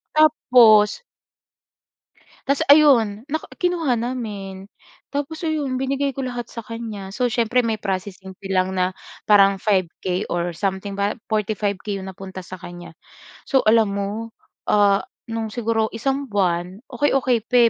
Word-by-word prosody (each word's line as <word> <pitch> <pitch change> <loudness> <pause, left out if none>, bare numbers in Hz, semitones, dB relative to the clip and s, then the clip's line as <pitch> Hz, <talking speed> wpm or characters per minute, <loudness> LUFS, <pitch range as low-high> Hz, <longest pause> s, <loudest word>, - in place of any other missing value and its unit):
Tapos 245 - +5 1.4
Tas 280 +1 +2
ayun. 245 -8 +5
Nak 315 +2 -3 0.2
kinuha 330 -9 +1
namin, 205 -6 -5 0.4
tapos 290 +4 -4
ayun 300 -5 -1
binigay 275 +1 -1
ko 270 - -3
lahat 245 -2 -4
sa 230 - -7
kanya. 215 -3 -7
So 250 +4 0
siyempre 240 +1 +1
may 220 -2 -1
processing 190 -1 -5
fee 195 -1 -5
lang 185 0 +1
na 185 0 +1 0.3
parang 200 -2 +6
5K 185 -1 -1
or 175 0 -1
something 195 +1 -3
ba? 200 +2 -1
45K 210 -2 -2
'yong 190 - -8
napunta 190 0 -8
sa 185 - -8
kanya. 175 -1 -10 0.5
So 270 -4 +3
alam 215 -2 +4
mo, 210 +3 -4 0.3
ah, 200 -1 +3 0.3
no'ng 225 0 -2
siguro 225 -2 0
isang 270 +4 -1
buwan, 185 -2 -1
okey 265 +3 +1
okey 255 -3 +2
pa 250 - +1
215 Hz, 140 wpm, -22 LUFS, 195-255 Hz, 1.4 s, parang